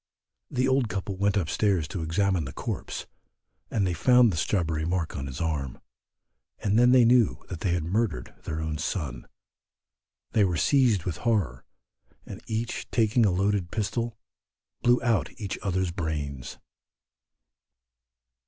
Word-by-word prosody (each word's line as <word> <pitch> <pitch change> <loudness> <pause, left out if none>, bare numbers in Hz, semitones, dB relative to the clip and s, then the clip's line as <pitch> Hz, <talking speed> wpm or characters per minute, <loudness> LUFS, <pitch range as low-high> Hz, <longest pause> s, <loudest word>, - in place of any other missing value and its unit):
The 130 +1 +1
old 130 -3 +2
couple 95 +1 -3
went 100 +2 +1
up 90 -6 0
stairs 95 -4 +1
to 90 - -4
examine 90 +1 +1
the 65 - -6
corpse, - - -5 0.6
and 100 -3 +1
they 90 - 0
found 125 +4 +5
the - - -2
strawberry 80 -3 0
mark 85 0 -1
on 70 -1 -4
its 65 +1 -6
arm, 75 -7 -2 0.8
and 105 +2 +1
they 120 - +6
then 125 -1 +6
knew 120 -3 +3
that 90 - -5
they 85 0 0
had 85 -3 0
murdered 85 - -1
their 80 +1 -3
own 80 -1 -3
son, 70 -8 -3 1.0
they 110 - +3
were 90 -4 +1
seized 120 - +3
with 90 -4 -3
horror, 100 - 0 0.6
and - - -9
each 110 +1 -3
taking 115 -1 +3
a - - +2
loaded 95 0 0
pistol 115 +2 -2 0.6
blew 120 0 +4
out 110 - 0
each 100 -3 -4
other's 95 -2 0
brains. 75 -7 -4
95 Hz, 150 wpm, -27 LUFS, 80-110 Hz, 1.0 s, they